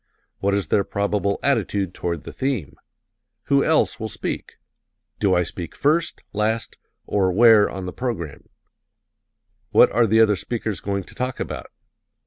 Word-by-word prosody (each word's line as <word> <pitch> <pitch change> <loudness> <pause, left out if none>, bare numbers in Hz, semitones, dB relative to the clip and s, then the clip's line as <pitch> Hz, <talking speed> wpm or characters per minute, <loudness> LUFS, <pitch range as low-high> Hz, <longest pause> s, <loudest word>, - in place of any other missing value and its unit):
What 100 0 +1
is 100 - -2
their 100 - +3
probable 100 0 -1
attitude 100 -8 0
toward 85 -3 -3
the - - -9
theme? 110 - -2 0.7
Who 140 -1 +3
else 160 -5 +2
will 110 - -3
speak? - - -5 0.7
Do 100 -3 +3
I 90 - +3
speak 85 0 -6
first, 155 +4 +1
last, 110 +2 -1 0.3
or 95 -2 +1
where, 110 +1 +6
on 95 -1 -6
the 90 - -5
program? 115 - -5 1.2
What - - +6
are 115 -1 +3
the 110 +2 +3
other 110 -2 +5
speakers 110 -1 -3
going 100 -1 -2
to - - -15
talk 125 0 -3
about? - - -5
105 Hz, 150 wpm, -22 LUFS, 95-120 Hz, 1.2 s, where